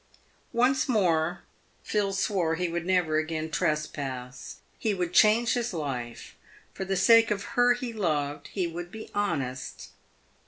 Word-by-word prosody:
Once 255 +3 +2
more 175 -6 +1 0.4
Phil 205 -2 0
swore 195 -4 0
he 180 +2 -1
would 170 +1 -3
never 175 -4 +2
again 160 0 -3
trespass. 145 -6 -3 0.2
He 215 -3 0
would 180 -2 -2
change 225 +2 +5
his 240 -5 -2
life. 125 -7 -5 0.4
Tor 190 - -5
the 195 0 0
sake 230 +4 +6
of 200 -1 -1
her 245 0 +4
he 245 -1 -5
loved, 150 -8 -1
he 190 -3 -2
would 175 +1 -6
be 220 +1 -9
honest. 130 -11 -3
180 Hz, 145 wpm, -27 LUFS, 155-215 Hz, 0.4 s, sake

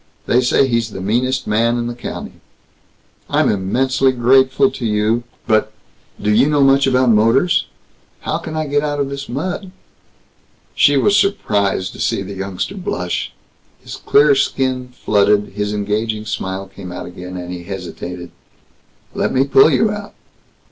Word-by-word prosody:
They 125 - +3
say 125 +2 +3
he's 115 -2 0
the 100 - -8
meanest 125 +7 0
man 115 +3 +1
in 120 - -2
the 120 - -3
county." 120 - -8 0.9
"I'm - - +2
immensely 130 +7 +1
grateful 130 +9 +3
to 125 - -8
you, 110 +2 0 0.2
but 110 -1 +1 0.5
do 105 - 0
you 135 +7 +4
know 145 -2 +3
much 135 0 +4
about 130 -2 +3
motors? 120 - +3 0.5
How - - -2
can 160 - -7
I 155 - -1
get 145 0 0
out 145 -1 -2
of 140 -1 -1
this 140 0 -6
mud?" 180 - -4 1.0
She 145 0 +4
was 200 +9 +3
surprised 100 - 0
to - - -12
see - - 0
the 100 +1 -7
youngster 95 - -4
blush. 90 - -3 0.5
His - - -8
clear 145 0 +4
skin 130 -2 0
flooded. 105 -4 +1
His 105 +1 -3
engaging 105 +1 -2
smile 95 -2 -4
came 95 -1 -10
again, 90 +1 -8
and 90 0 -6
he 85 -1 -8
hesitated, 90 -2 -7 0.8
"Let - - -1
me 130 - +3
pull 135 +2 +5
you 215 +6 +2
out." 205 -1 -7
120 Hz, 155 wpm, -18 LUFS, 100-135 Hz, 1.0 s, pull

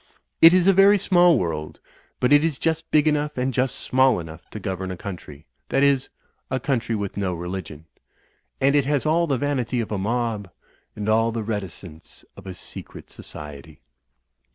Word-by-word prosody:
It 165 - +10
is 180 -1 +3
a 195 - +6
very 195 +2 +6
small 175 -3 +4
world, 75 -3 -4 0.4
but 125 +3 +3
it 145 +1 +6
is 160 -4 0
just 160 +2 -2
big 150 0 +3
enough 150 -1 0
and 130 +1 -1
just 130 +1 0
small 130 -4 +2
enough 80 0 -10
to 110 - -7
govern 95 -1 -4
a 90 - -5
country 85 -7 -9
— - - -48
^that 135 - +2
is, 140 -2 +2 0.4
a 130 - -1
country 120 -3 -1
with 100 -2 -4
no 95 -3 -1
re 85 +1 -6
ligion. 90 -5 -6 0.8
And 140 +1 +3
it 145 -2 +3
has 145 0 0
all 165 +2 +2
the 135 -3 0
vanity 130 -3 -1
of 115 - -3
a 105 - -1
mob; 110 -1 -2 0.5
and 105 0 -5
all 115 +1 +2
the 115 -1 -3
reticence 95 -6 -7
of 100 -1 -13
a 95 - -6
secret - - -10
society. 75 0 -10
115 Hz, 190 wpm, -23 LUFS, 95-145 Hz, 0.8 s, It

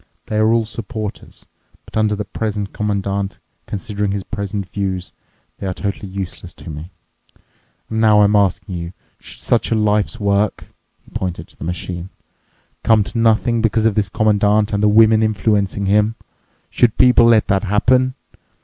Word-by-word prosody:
They 105 - -3
are 110 +1 +3
all 115 -1 +2
supporters, 110 -1 -7 0.4
but - - -15
under 110 -1 +2
the 105 0 -4
present 105 -1 -4
Commandant, 100 -1 -2 0.3
considering 105 0 -3
his 100 0 -2
present 100 -2 -4
views, 95 -2 -4 0.5
they 95 - -4
are 90 - -3
totally 100 0 -4
useless 95 -2 -7
to 85 - -9
me. 75 +3 -8 1.0
And 110 0 -2
now 105 -2 +5
I'm 105 +1 +3
asking 100 -1 +1
you: 85 0 -5 0.3
Should - - -11
such - - +1
a - - +1
life's 105 +2 +1
work," 100 0 0 0.3
he - - -20
pointed 90 -2 -4
to - - -17
the - - -10
machine, 90 +1 -5 0.7
"come 110 -2 +4
to 115 - -6
nothing 115 +1 +2
because 110 0 +1
of 115 - +3
this 100 -2 0
Commandant 105 +1 +2
and 100 - 0
the 105 - +4
women 110 +1 +5
influencing 105 -2 0
him? 105 +3 +2 0.6
Should 120 -3 +2
people 125 -2 +6
let 115 -2 +5
that 95 +1 +1
happen? 125 +6 +2
105 Hz, 165 wpm, -19 LUFS, 100-110 Hz, 1.0 s, people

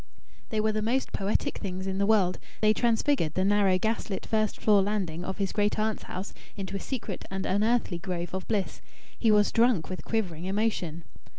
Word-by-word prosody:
They 220 - -1
were 215 0 +2
the 215 0 -1
most 245 +5 0
poetic 195 +1 0
things 190 -2 -4
in 190 0 -2
the 200 - +2
world. 195 -5 +3 0.2
They 215 0 +5
transfigured 230 - +1
the 185 - +2
narrow, 200 -2 +4
gaslit 220 -1 -2
first 215 -1 0
floor 210 -2 +5
landing 190 -5 -2
of 190 +1 -4
his 195 -2 -1
great 205 -1 +1
aunt's 215 0 0
house 185 +2 -6 0.2
into 195 0 -4
a - - -2
secret 225 -6 -5
and 190 0 -3
unearthly 210 -2 +1
grove 175 -1 -4
of 190 0 -4
bliss. 205 -4 -1 0.4
He 230 - +3
was 210 -1 +4
drunk 230 -8 +3
with 185 - -5
quivering 180 -7 -2
emotion. 190 -5 -1
200 Hz, 190 wpm, -28 LUFS, 185-220 Hz, 0.4 s, They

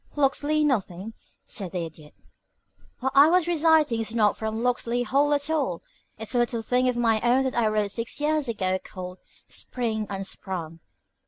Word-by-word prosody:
"Locksley 295 +2 +2
nothing," 215 -6 -1 0.3
said 195 -5 -4
the 175 -2 -2
Idiot. 155 -2 -13 0.9
"What 265 +1 0
I 280 +3 +7
was 355 -1 +3
reciting 320 -7 +3
is 225 0 -2
not 210 -3 +3
from 220 +1 -3
'Locksley 245 -1 0
Hall' 280 +5 +2
at 285 0 -1
all. 285 - -1 0.3
It's 220 +3 -6
a 245 - +2
little 235 -1 0
thing 250 +2 +2
of 245 - -1
my 225 -2 +2
own 250 +2 +3
that 260 - -1
I 235 -2 +2
wrote 210 -1 0
six 230 +7 -2
years 300 -1 +1
ago 190 -4 0
called 180 0 -8 0.3
'Spring 220 -4 -3
Unsprung.' 190 -4 -5
235 Hz, 170 wpm, -25 LUFS, 205-275 Hz, 0.9 s, I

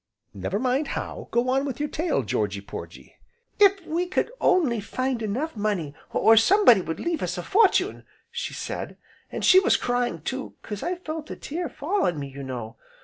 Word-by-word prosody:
"Never 100 - -3
mind 260 +5 0
how, - - -5
go 240 +1 +1
on 265 +1 +2
with 275 -3 -4
your 295 - 0
tale, 330 +4 -1
Georgy - - -1
Porgy." - - -10 0.4
"'If 395 -3 +5
we 345 +3 -1
could 380 +5 0
only 290 -12 +3
find 255 +3 -2
enough 245 +9 -2
money, 205 -9 -1 0.2
or 225 - +5
somebody 245 - +6
would 165 -2 -5
leave 335 -2 -2
us 180 0 -2
a 175 - -4
fortune,' 415 - +2 0.3
she - - -4
said, - - -5 0.3
an' - - -4
she 370 - +7
was 380 - +3
crying 245 -10 -1
too, 265 +6 -4
'cause 210 -2 -6
I 360 - -1
felt 315 -3 -6
a - - -5
tear 340 +3 -4
fall 380 +8 0
on 175 - -1
me, 140 -1 -5
you 140 +1 -9
know. 125 -4 -6
255 Hz, 190 wpm, -25 LUFS, 205-335 Hz, 0.4 s, she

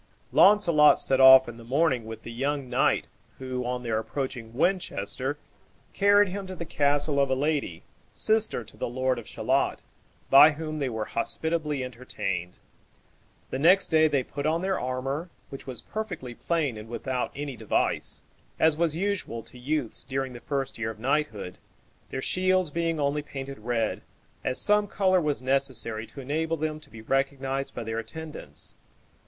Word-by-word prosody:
Launcelot 170 -8 +6
set 135 0 +2
off 130 0 +9
in 120 -1 -8
the 115 - -11
morning 130 -1 +1
with 110 0 -8
the 115 - -7
young 135 +3 -2
knight, 125 +2 +2 0.3
who, 130 -1 -4
on 125 0 -3
their 115 -2 0
approaching 120 -1 -4
Winchester, 140 - -1 0.6
carried 205 0 +5
him 195 +1 -5
to 185 - -6
the 170 - -5
castle 145 -1 +1
of 140 -1 +3
a 130 - +2
lady, 140 - -1 0.3
sister 220 - 0
to - - -12
the - - -3
lord 130 0 0
of 115 - -11
Shalott, - - 0 0.5
by 150 +3 +9
whom 155 0 -5
they 135 -3 -1
were 110 -2 -3
hospitably 150 +3 -2
entertained. 95 -8 -4 0.9
The 130 - -2
next 180 +6 +5
day 160 -1 +5
they 140 -4 +1
put 140 +3 -4
on 165 +3 0
their 190 0 0
armor, 135 +6 -3 0.2
which 135 - -9
was 125 -3 -3
perfectly 180 - -5
plain 145 -3 -1
and 105 +1 -9
without 125 +1 -3
any 140 -1 -5
device, 110 -2 -1 0.4
as 160 -1 +4
was 165 -1 +1
usual 190 - -2
to 125 - -10
youths 140 -2 -2
during 135 0 -3
the 120 - -8
first 135 -2 -3
year 110 -1 -1
of 110 - -7
knighthood, 125 -8 -1 0.5
their 130 - -4
shields 185 -3 +1
being 165 0 -1
only 145 +1 0
painted 135 -2 -7
red, 115 0 -1 0.4
as 130 - 0
some 210 0 +4
color 185 -2 +2
was 150 -4 -1
necessary 130 -4 -1
to 135 +5 -9
enable 160 +5 -1
them 155 0 -2
to - - -17
be 110 0 -11
recognized 135 +1 -1
by - - -4
their 115 0 -3
attendants. 130 - -8
135 Hz, 170 wpm, -27 LUFS, 125-160 Hz, 0.9 s, off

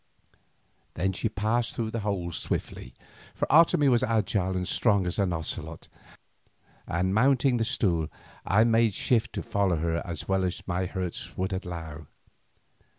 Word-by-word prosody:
Then 95 +4 0
she 110 - -2
passed 110 +3 -1
through 110 -2 -2
the 115 - -2
hole 100 -5 -2
swiftly, 60 -5 -4 0.4
for - - 0
Otomie 155 -2 +5
was 120 -3 +4
agile 105 -6 0
and 90 -1 -2
strong 100 -4 +2
as 90 +4 -2
an 95 -3 +1
ocelot, 80 -1 -5 1.0
and 90 +3 0
mounting 130 +2 +3
the 115 - +1
stool 95 -10 +1 0.4
I 105 +4 +4
made 115 -3 +3
shift 120 -3 +1
to - - -4
follow 100 -6 +1
her 85 +1 -1
as 85 -3 -6
well 95 -1 +1
as 90 -1 -3
my 90 0 -1
hurts 90 -2 -5
would 95 +1 -1
allow. 85 -5 -6
95 Hz, 150 wpm, -27 LUFS, 90-115 Hz, 1.0 s, Otomie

